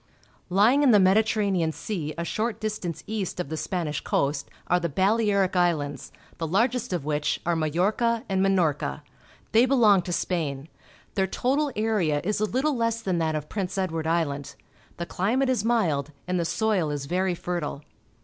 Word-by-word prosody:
Lying 215 +10 +4
in 285 - +5
the 210 -4 +7
Mediterranean 195 -3 +2
Sea 160 -3 -4
a 170 - -2
short 220 +5 -2
distance 210 -6 -4
east 210 -4 -3
of 180 - -3
the 160 - -3
Spanish 160 -2 -2
coast, 140 0 -1 0.2
are 180 - +2
the 170 -1 -2
Balearic 200 +2 +2
Islands, 150 -6 0 0.3
the 165 - -2
largest 235 +7 +1
of 175 -6 -2
which 150 -1 0
are 175 0 +1
Majorca 205 - +1
and 190 -1 0
Minorca. 180 -7 +1 0.5
They 235 +3 +5
belong 220 -8 +5
to 175 - -6
Spain. 155 -5 -2 0.4
Their 190 -1 +1
total 275 +8 0
area 210 -9 +1
is 210 +2 -1
a 215 - +2
Uttle 270 +6 0
less 230 -1 -1
than 185 -4 0
that 160 -1 0
of 150 -1 -4
Prince 195 0 -3
Edward 165 -4 -1
Island. 145 -4 -1 0.4
The 170 - -3
climate 240 +11 0
is 240 -5 0
mild, 170 -12 +1 0.2
and 180 0 0
the 170 - 0
soil 195 -2 +1
is 145 -1 -3
very 180 +4 0
fertile. 170 -5 -4
185 Hz, 170 wpm, -26 LUFS, 160-220 Hz, 0.5 s, the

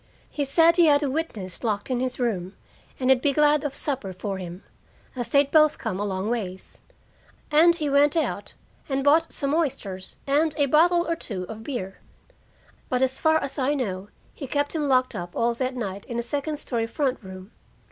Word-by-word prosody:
He 290 - -2
said 330 +5 +5
he 340 -2 +6
had 290 0 +4
a 275 - 0
witness 225 - -4
locked 215 +2 -2
in 250 - 0
his 255 0 -2
room, 195 -6 -2 0.4
and 260 0 +3
he'd 255 -1 +4
be 285 0 +2
glad 300 0 +3
of 285 -2 -3
supper 260 -10 -2
for 195 +1 -4
him, 180 0 -8 0.5
as 240 -3 -4
they'd 280 +1 +3
both 305 -1 +5
come 185 - -4
a - - -1
long 190 0 -2
ways. 195 -6 -5 0.7
And 335 +3 +6
he 305 -3 -2
went 285 +2 +3
out 320 - -2 0.3
and 270 0 0
bought 315 +4 +4
some 280 -1 -1
oysters 205 - -3
and 295 +3 +2
a 290 - +3
bottle 345 +5 +3
or 335 - 0
two 200 - -5
of 220 +4 -8
beer. 200 -8 -5 0.9
But 255 0 +1
as 260 0 0
far 315 -1 +4
as 280 +1 -4
I 275 +3 +1
know, 200 -7 -3 0.3
he 275 - -7
kept 285 +2 -1
him 305 -3 -1
locked 255 -1 +2
up 175 0 -6
all 235 +1 +1
that 255 +2 -3
night 200 -5 -5
in 235 - -5
the 235 - -1
second 290 +4 -3
story 235 -5 -2
front 265 +1 -1
room. 190 +1 -11
260 Hz, 200 wpm, -25 LUFS, 210-295 Hz, 0.9 s, he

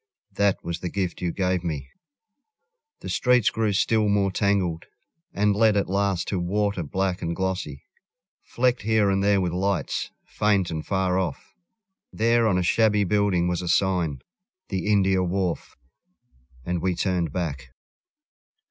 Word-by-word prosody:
That 100 -1 +1
was 85 0 -4
the 90 - -4
gift 95 -3 -3
you 90 -1 -1
gave 90 0 -1
me.... 75 -6 -4 1.1
The - - -7
streets 125 -3 +3
grew 110 -2 0
still 105 +2 +2
more 100 -1 +2
tangled, 95 -5 0 0.5
And 105 0 +1
led 110 -1 +4
at 100 - +1
last 100 -3 0
to 95 - -1
water 100 +2 -1
black 95 +4 -2
and 85 0 -2
glossy, 95 -7 -3 0.6
Flecked 125 0 0
here 110 -2 +2
and 95 0 +1
there 100 0 +3
with 90 -2 -1
lights, 95 -4 -1 0.2
faint 100 -4 +1
and 80 -1 -4
far 95 -1 0
off. 85 -7 -4 0.6
There 115 +1 +2
on 95 -4 +2
a 90 - +1
shabby 105 +2 +3
building 100 -3 +1
was 90 0 -1
a 90 - -5
sign 85 -7 +1 0.5
"The 95 -1 -3
India 95 -3 +3
Wharf 90 -1 -2 0.4
"... 65 - -30
and 90 -1 -2
we 90 0 0
turned 90 -4 -1
back. 80 -5 -4
95 Hz, 155 wpm, -24 LUFS, 85-100 Hz, 1.1 s, led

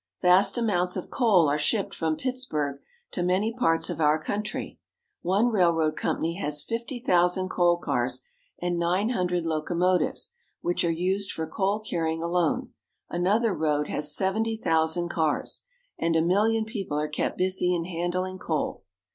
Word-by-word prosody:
> - - -35
^Vast 185 +5 +5
amounts 180 -6 +1
of 185 - -6
coal 205 - +4
are 145 +1 +1
shipped 195 +7 0
from 160 -1 -1
Pittsburg 155 - -3 0.3
to - - -2
many 185 +5 +1
parts 165 -10 +1
of - - -4
our 150 0 +4
country. 210 +6 -4 0.4
One 200 +7 +2
railroad 170 -7 +2
company 165 +2 -1
has 150 -5 -2
fifty 235 +3 -4
thousand 185 -4 +2
coal 175 -1 +3
cars, - - -1 0.4
and 175 -1 -1
nine 180 +6 +1
hundred 180 -6 0
locomotives 170 - 0 0.3
which 175 - 0
are 170 - +2
used 185 +4 0
for 160 - -3
coal 195 +6 -1
carrying 165 -5 -2
alone; 170 -1 0 0.4
another 200 +5 +2
road 150 -2 0
has 150 0 0
seventy 220 +4 0
thousand 165 -2 +1
cars; 160 -3 -1 0.3
and 165 0 +1
a 160 - +4
million 215 +5 +2
people 195 - -3
are 150 - -1
kept 150 - -2
busy 185 -1 +2
in 175 -2 0
handUng 180 +2 -3
coal. 160 -4 -2
180 Hz, 155 wpm, -26 LUFS, 165-200 Hz, 0.4 s, ^Vast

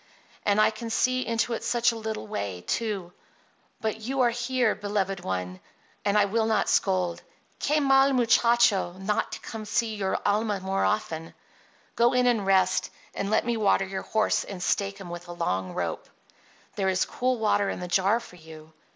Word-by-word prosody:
And 205 0 +3
I 215 +1 +5
can 230 +1 -7
see 255 +2 +1
into 230 +1 -1
it 225 - -4
such 240 0 +2
a - - -6
little 220 - -4
way, 100 -4 -4
too. 200 -6 -2 0.7
But 220 0 -2
you 260 +4 -1
are 240 -1 +4
here, 240 -1 +1
beloved 200 -2 -2
one, 90 - -4 0.4
and 205 0 +2
I 205 - +5
will 220 +2 0
not 220 -1 +1
scold. 185 -3 +1 0.4
Que 300 +2 +2
mal 270 -1 +4
muchacho! 235 -6 +3
not 190 +3 -2
to - - -5
come 225 - -7
to 210 - -10
see 230 -2 +1
your 195 -2 -1
alma 210 0 +1
more 190 +1 -1
often. 165 -6 -2 0.6
Go 235 +1 +4
in 250 0 +3
and 225 -5 +2
rest, 185 -1 +3 0.2
and 200 - -3
let 215 - +2
me 235 -1 0
water 200 -2 +2
your 190 0 -4
horse 220 -1 +1
and 185 -3 -7
stake 200 +1 0
him 185 -3 -9
with 175 0 -7
the 175 -1 -8
long 95 - -2
rope. 85 -2 -3 0.7
There 190 -2 +1
is 185 0 +1
cool 255 0 -1
water 205 -2 +1
in - - -4
the 180 - -5
jar 190 +5 +2
for 205 -6 -13
you." 160 -1 -13
205 Hz, 190 wpm, -26 LUFS, 185-230 Hz, 0.7 s, I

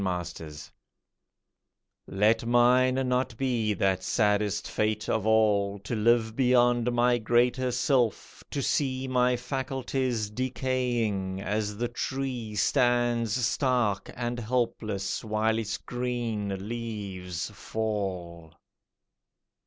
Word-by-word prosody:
USELESSNESS 85 -5 -5 1.4
Let 105 +4 +2
mine 125 +2 +4
not 125 -2 0
be 115 -5 0
that 95 0 +1
saddest 105 -2 +1
fate 105 0 -1
of 110 -1 0
all 105 -2 +3
To 100 +4 -5
live 110 0 +2
beyond 120 -2 +3
my 120 0 +3
greater 120 +3 +2
self; 125 -2 0
to 140 - -3
see 130 -1 0
My 125 -1 +2
faculties 130 -3 -2
decaying, 120 -6 -1
as 105 +1 -2
the 120 +2 -1
tree 125 -2 -4
Stands 120 0 +2
stark 120 -4 0
and 120 0 -3
helpless 110 -4 -2
while 110 +1 +1
its 110 -2 -3
green 115 -6 -3
leaves 100 -7 -5
fall. 95 -7 -4
115 Hz, 100 wpm, -28 LUFS, 105-125 Hz, 1.4 s, mine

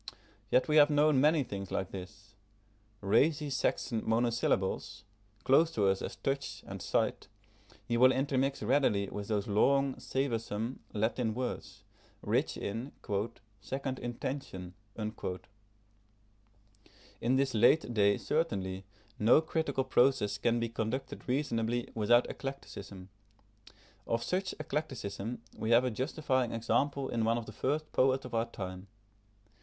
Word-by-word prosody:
Yet 125 - +3
we 155 0 +3
have 145 0 +8
known 150 -2 +4
many 150 0 +4
things 100 -5 -6
like 95 - -2
this. 100 +2 -9 0.7
Racy 145 +9 +2
Saxon 125 -3 0
monosyllables, 115 -3 0 0.4
close 160 +5 +5
to 105 - +1
us 95 0 +2
as - - -5
touch 135 0 -3
and - - -7
sight, - - 0 0.6
he 120 -1 0
will 130 +2 +7
intermix 135 -1 0
readily 105 -5 +2
with 100 -1 -5
those 105 -2 -1
long, 135 +6 +3
savoursome, 115 -2 -2
Latin 110 +1 0
words, 125 0 -5 0.4
rich - - 0
in 115 +7 -4 0.7
"second 130 +5 -4
intention." 120 -7 -5 0.2
In 110 -1 -3 2.2
this 135 0 +1
late 120 +4 +4
day 100 -2 +4
certainly, 95 - -1 0.3
no 110 +7 +6
critical 160 -4 -1
process 120 -6 +2
can 120 +2 +2
be 115 - 0
conducted 115 +4 -4
reasonably 120 -3 0
without 120 +2 +4
eclecticism. 100 -9 -7 1.0
Of 115 0 0
such 185 +6 -1
eclecticism 125 -8 -4
we 110 - -3
have 120 +1 +6
a 125 - 0
justifying 130 0 -1
example 135 +4 0
in 115 -1 0
one 115 +1 +2
of 115 - -4
the - - -8
first 150 +8 -2
poets 130 0 +2
of 125 - -9
our 115 0 +1
time. 95 -3 -7
120 Hz, 130 wpm, -32 LUFS, 105-135 Hz, 2.2 s, have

